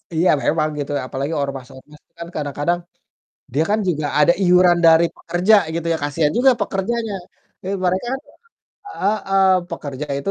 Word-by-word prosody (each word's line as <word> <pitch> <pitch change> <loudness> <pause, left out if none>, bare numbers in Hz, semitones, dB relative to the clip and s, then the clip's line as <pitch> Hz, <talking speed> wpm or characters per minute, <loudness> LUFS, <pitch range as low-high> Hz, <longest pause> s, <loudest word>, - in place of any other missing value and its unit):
Iya, 175 +3 +3
memang 155 0 +1
gitu 145 - -4
ya, - - -3
apalagi 140 +5 -4
ormas-ormas 135 +1 -8
tuh - - -51
kan 170 - -6
kadang-kadang 145 +3 -1 0.7
dia 150 - +2
kan 215 +1 +2
juga 155 -4 -1
ada 150 +3 +5
iuran 180 -1 +5
dari 165 +1 +6
pekerja 180 +5 +1 0.2
gitu 170 0 -3
ya, - - -1
kasihan 150 +1 0
juga 260 +1 +5
pekerjanya. 220 +3 -2 0.5
Duit 195 +2 -3
mereka 185 +4 0
kan 265 - -2 0.7
heeh, 195 - 0 0.3
pekerja 145 -3 -6
itu 140 - -3
170 Hz, 155 wpm, -20 LUFS, 145-195 Hz, 0.7 s, dari